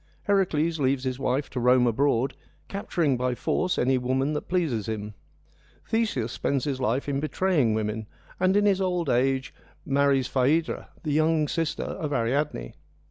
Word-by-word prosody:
Heracles 170 -5 +1
leaves 135 -1 +1
his 130 -1 -2
wife, 135 +1 0
to 130 - -3
roam 125 +1 +4
abroad, 130 +1 +1 0.3
capturing 170 -8 0
by 125 0 -1
force 185 +8 0
any 130 +1 +2
woman 130 +4 0
that 150 - -4
pleases 155 - 0
him. 105 -1 -4 0.7
Theseus 210 - 0
spends 135 0 -1
his 135 -3 -2
life 125 +4 0
in 140 -1 0
betraying 150 - +1
women, 110 0 -2 0.3
and 185 +2 +3
in 205 - +3
his 195 -2 +3
old 180 -5 0
age 130 +2 +1 0.3
marries 140 -1 +2
Phaedra, 140 +6 0
the 155 - -2
young 155 0 +2
sister 165 +1 -2
of 150 -2 -4
Ariadne. 120 - -1
140 Hz, 155 wpm, -26 LUFS, 125-160 Hz, 0.7 s, roam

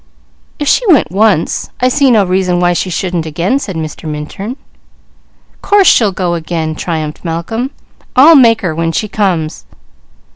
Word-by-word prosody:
"If 290 - -3
she - - +3
went 290 - +3
once, 200 -4 +1
I 250 - +2
see 275 +1 +2
no 220 -4 +4
reason 180 -1 0
why 175 0 +2
she 185 - -2
shouldn't 175 -2 -3
again," 175 - -1
said 190 -9 -6
Mr. 155 0 -6
Minturn. 170 - -6 1.0
"Course 410 -1 +3
she'll 220 - +4
go 180 -2 -2
again!" 160 -1 -3
triumphed 155 -2 -4
Malcolm. 180 +10 -3 0.5
"I'll 305 +6 +7
make 230 -5 +5
her, 175 -4 -2
when 165 +1 -1
she 215 - -1
comes." 185 -7 -2
185 Hz, 155 wpm, -13 LUFS, 165-230 Hz, 1.0 s, I'll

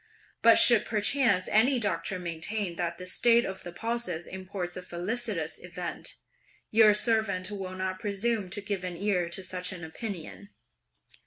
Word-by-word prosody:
But 230 0 +7
should 235 -4 +8
perchance 215 -3 +2
(any 250 +5 +4
doctor 190 -4 -1
maintain) 180 +2 -3
that 170 -1 -2
this 180 0 -1
state 235 0 +4
of 190 0 -5
the 175 - -7
pulses 225 -5 -3
imports 185 -1 -6
a 185 - -5
felicitous 180 +7 -3
event, - - -5 0.6
your 215 -1 +6
servant 210 -3 +1
will 190 -2 -5
not 185 0 -3
presume 205 0 -1
to 205 - -4
give 200 -2 -3
an 180 -2 -4
ear 185 -3 0
to 190 +2 -5
such 180 0 -4
an 180 -2 -8
opinion!" 200 +2 -7
190 Hz, 155 wpm, -28 LUFS, 180-220 Hz, 0.6 s, should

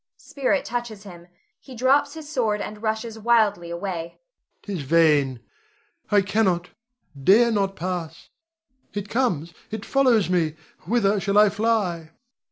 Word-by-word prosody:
Spirit 280 0 -1
touches 235 -4 -5
him; 175 -4 -12 0.3
he 260 - -13
drops 280 +4 +2
his 315 -2 -9
sword 230 -8 0
and 210 +1 -6
rushes 220 0 -3
wildly 210 -6 +2
away._] 170 -1 -5 0.5
'Tis 195 -6 -4
vain: 145 -4 +3 0.7
I 205 -1 +4
cannot 190 -4 0 0.5
dare 230 - +5
not 195 -2 0
pass. 170 -3 -5 0.7
It 205 0 -4
comes, 175 - -1 0.2
it 220 -1 -6
follows 250 -9 +3
me. 170 -4 0 0.3
Whither 210 -3 +2
shall 200 +1 0
I 210 0 +7
fly? 200 -6 -1
205 Hz, 130 wpm, -23 LUFS, 175-230 Hz, 0.7 s, I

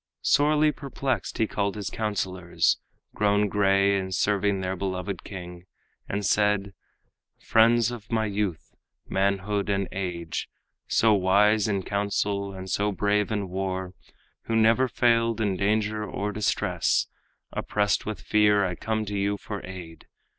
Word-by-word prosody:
Sorely 150 +1 +4
perplexed 135 -2 -3
he 110 - +2
called 100 -1 -2
his 100 -3 -4
counselors, 95 -5 0 0.3
Grown 105 0 +2
gray 100 -1 +3
in 95 0 -5
serving 100 +1 +1
their 95 0 -2
beloved 95 0 -4
king, 90 -2 -9 0.4
And 100 0 -2
said: 105 0 +2 0.7
"Friends 115 +1 +4
of 115 -2 -9
my 110 -1 +1
youth, 100 -5 -3 0.3
manhood 100 +1 0
and 100 -1 0
age, 90 -3 -4 0.4
So 110 -1 +4
wise 105 +2 +3
in 100 -2 -1
counsel 100 0 -1
and 95 -1 -8
so 105 +2 0
brave 105 +2 +1
in 105 -2 -1
war, 95 0 -3 0.5
Who 115 - -1
never 115 +4 +4
failed 115 -2 +2
in 100 -3 0
danger 105 +2 0
or 105 0 -3
distress, 100 -4 +1 0.5
Oppressed 105 0 0
with 110 -3 -5
fear, 105 -1 +3
I 90 - -2
come 110 +4 -2
to 105 0 -4
you 100 +1 0
for 100 -1 -7
aid. 90 -4 -10
100 Hz, 140 wpm, -26 LUFS, 95-105 Hz, 0.7 s, Sorely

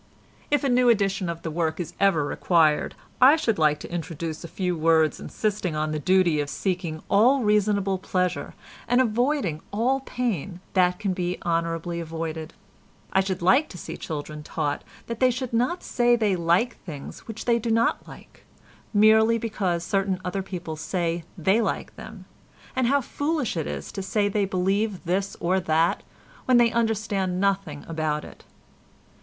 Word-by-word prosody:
If 290 -2 +2
a - - +2
new 250 -1 +4
edition 195 -4 +1
of 170 0 -5
the 160 - -3
work 160 0 -1
is 175 - -4
ever 190 -7 +3
required 155 0 +2 0.3
I 270 +4 +8
should 230 - 0
like 150 -1 +3
to - - -8
introduce 165 -1 -4
a - - -6
few 180 +1 -2
words 160 -1 +3
insisting 205 -6 -2
on 155 0 -1
the 155 - -2
duty 175 -1 +3
of 145 -1 -2
seeking 175 -4 -3
all 245 +6 +4
reasonable 205 -2 +2
pleasure 180 -1 -2 0.3
and 245 - +3
avoiding 240 - +1
all 245 +6 +1
pain 205 - -3
that 180 -1 +3
can 200 -2 -1
be 180 -1 -2
honourably 170 0 -1
avoided. 160 -1 -5 0.6
I 190 - +4
should 190 -2 -1
like 260 - +4
to 180 - -9
see - - -7
children 150 -1 -6
taught 150 -1 -3 0.2
that 230 -1 -5
they 255 - +5
should 250 0 -3
not 250 +10 0
say 240 -1 +3
they 215 -5 +1
like 175 +8 +1
things 150 -6 -9
which 225 -1 -7
they 235 -1 +3
do 230 +1 -3
not 230 +1 +1
like, - - -14 0.5
merely 220 +2 +5
because 195 -7 -2
certain 195 +1 0
other 180 +2 -2
people 180 -4 -6
say 165 +1 -2
they 190 +7 +3
like - - -3
them, - - -10 0.5
and 260 -2 +2
how 280 +2 +3
foolish 290 - -2
it 160 -3 -2
is - - -5
to 195 - -5
say 205 +2 0
they 205 0 +1
believe 195 +2 0
this 190 +3 -1
or 185 +2 +1
that 165 -1 +1 0.4
when 255 -1 +5
they 235 -1 +5
understand 210 -5 0
nothing 195 -7 -1
about 155 -2 -2
it. - - -14
190 Hz, 170 wpm, -25 LUFS, 165-225 Hz, 0.6 s, I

